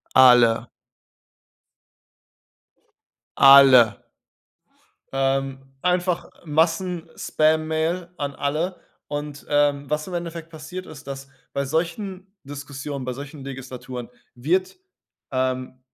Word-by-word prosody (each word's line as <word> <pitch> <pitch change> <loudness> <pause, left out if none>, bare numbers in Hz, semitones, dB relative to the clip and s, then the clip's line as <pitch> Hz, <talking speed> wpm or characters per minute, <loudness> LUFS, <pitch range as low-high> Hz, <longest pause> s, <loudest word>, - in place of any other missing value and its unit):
Alle. 125 -3 +6 2.7
Alle. 135 -5 +8 1.2
Ähm, 135 0 0 0.2
einfach 180 -1 0 0.2
Massenspammail 160 0 0
an 140 -1 -3
alle. 160 +6 -1 0.3
Und, 145 0 -5
ähm, 145 -1 +2
was 150 0 -1
im 185 - -7
Endeffekt 170 -1 -5
passiert 165 +3 -8
ist, 140 -2 -12
dass 135 0 -7 0.2
bei 140 - 0
solchen 180 +6 -3 0.2
Diskussionen, 140 -1 -6
bei 125 - -3
solchen 140 +1 -9
Legislaturen 130 -2 -7 0.3
wird 175 +9 0 0.6
ähm, 130 -1 -2
145 Hz, 85 wpm, -23 LUFS, 135-165 Hz, 2.7 s, Alle